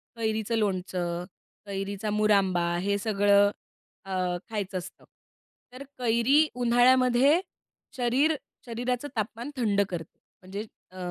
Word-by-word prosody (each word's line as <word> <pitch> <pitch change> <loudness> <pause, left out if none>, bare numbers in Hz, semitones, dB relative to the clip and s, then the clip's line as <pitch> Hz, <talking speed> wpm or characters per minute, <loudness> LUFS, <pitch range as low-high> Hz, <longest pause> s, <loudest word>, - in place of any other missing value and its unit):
कैरीचं 220 0 -1
लोणचं, 180 -4 -2 0.4
कैरीचा 200 +1 -4
मुरांबा 195 -5 +2
हे 200 +1 0
सगळं 205 -1 +3 0.5
अ, 195 - -8 0.4
खायचं 200 -4 -3
असतं. 180 0 -9 0.7
तर 260 - -8
कैरी 250 +5 +3
उन्हाळ्यामध्ये 250 +4 +4 0.6
शरीर 260 +6 +2 0.3
शरीराचं 245 +3 -2
तापमान 230 +5 -3
थंड 205 -5 +2
करते. 165 -3 -7 0.2
म्हणजे 195 +3 -6 0.3
अ, 185 - -13
215 Hz, 105 wpm, -27 LUFS, 195-245 Hz, 0.7 s, उन्हाळ्यामध्ये